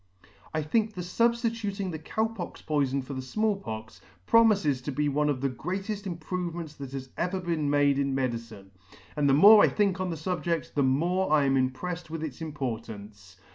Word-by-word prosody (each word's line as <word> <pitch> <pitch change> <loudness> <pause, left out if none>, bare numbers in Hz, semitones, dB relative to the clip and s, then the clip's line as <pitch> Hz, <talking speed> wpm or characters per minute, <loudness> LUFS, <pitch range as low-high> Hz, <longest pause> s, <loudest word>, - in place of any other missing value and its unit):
I 155 -1 -1
think 215 +7 0
the 180 - -4
Sub 230 +7 +2
stituting 225 -5 -3
the 160 - -5
Cow 220 +8 -1
pox 220 -6 -6
poifon 140 -3 0
for 140 - -7
the 130 - -4
Small 215 +11 0
Pox, 110 - -8 0.2
promifes 200 - +4
to 145 - -3
be 150 +2 0
one 150 +1 +1
of 135 -3 -1
the 135 - +1
greateft 195 - -4
improvements 170 -2 -4
that 140 -3 -7
has 130 -1 -6
ever 180 +2 -1
been 165 -5 -1
made 145 -1 +3
in 140 -1 0
medicine; 115 -6 -4 0.4
and 145 -1 +2
the 135 - +5
more 205 +7 +9
I - - +7
think 200 -3 +1
on 185 - -1
the 165 - -3
fubjedt, 170 0 -2
the 145 - +1
more 170 +8 +1
I 150 -2 +4
am 135 - +2
impreSTed 135 +7 -1
with 160 0 -5
its 150 -2 -6
importance. 110 - -6
155 Hz, 195 wpm, -28 LUFS, 135-185 Hz, 0.4 s, more